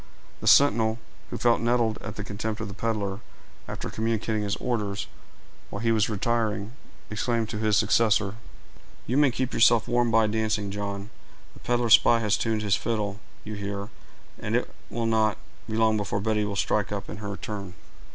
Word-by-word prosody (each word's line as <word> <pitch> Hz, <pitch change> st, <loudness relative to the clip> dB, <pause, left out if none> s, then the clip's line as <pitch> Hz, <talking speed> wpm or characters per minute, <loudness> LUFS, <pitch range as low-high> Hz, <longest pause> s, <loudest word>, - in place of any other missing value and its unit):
The -, -, -5 dB
sentinel, 115 Hz, -5 st, +5 dB, 0.3 s
who -, -, -4 dB
felt 120 Hz, -2 st, +3 dB
nettled 115 Hz, -2 st, +1 dB
at -, -, -6 dB
the 100 Hz, -, -5 dB
contempt 105 Hz, +2 st, -4 dB
of 110 Hz, -, -4 dB
the 100 Hz, -, -7 dB
peddler, 105 Hz, -3 st, -2 dB, 0.5 s
after -, -, -5 dB
communicating 110 Hz, -1 st, -1 dB
his 100 Hz, -1 st, -1 dB
orders, 105 Hz, -5 st, -2 dB, 0.6 s
while 100 Hz, -, -5 dB
he 115 Hz, -, +3 dB
was 110 Hz, -1 st, +2 dB
retiring, 110 Hz, -1 st, -1 dB, 0.4 s
exclaimed 115 Hz, +1 st, -1 dB
to 105 Hz, -, -4 dB
his 110 Hz, -2 st, +2 dB
successor,— 105 Hz, -3 st, +3 dB, 0.7 s
"You 125 Hz, -, -1 dB
may 145 Hz, -2 st, +5 dB
keep 130 Hz, +1 st, -2 dB
yourself 115 Hz, -1 st, +4 dB
warm 120 Hz, 0 st, +2 dB
by 110 Hz, 0 st, +4 dB
dancing, 105 Hz, -2 st, -1 dB
John; 100 Hz, +1 st, -5 dB, 0.4 s
the -, -, -16 dB
peddler 120 Hz, -1 st, 0 dB
spy 115 Hz, -, +7 dB
has 105 Hz, -2 st, +1 dB
tuned 110 Hz, -2 st, -1 dB
his 100 Hz, -2 st, +3 dB
fiddle, 105 Hz, -3 st, -2 dB, 0.2 s
you 110 Hz, -, -6 dB
hear, 100 Hz, 0 st, -4 dB, 0.5 s
and -, -, -2 dB
it -, -, -1 dB, 0.2 s
will 115 Hz, 0 st, -2 dB
not 110 Hz, -2 st, +2 dB, 0.3 s
be 110 Hz, -, -2 dB
long 110 Hz, -1 st, +3 dB
before 100 Hz, -1 st, -1 dB
Betty 105 Hz, 0 st, 0 dB
will 100 Hz, -1 st, -3 dB
strike 100 Hz, 0 st, 0 dB
up, 100 Hz, -1 st, -4 dB
in -, -, -7 dB
her 100 Hz, -1 st, -5 dB
turn." 100 Hz, -3 st, -6 dB
110 Hz, 180 wpm, -26 LUFS, 100-115 Hz, 0.7 s, spy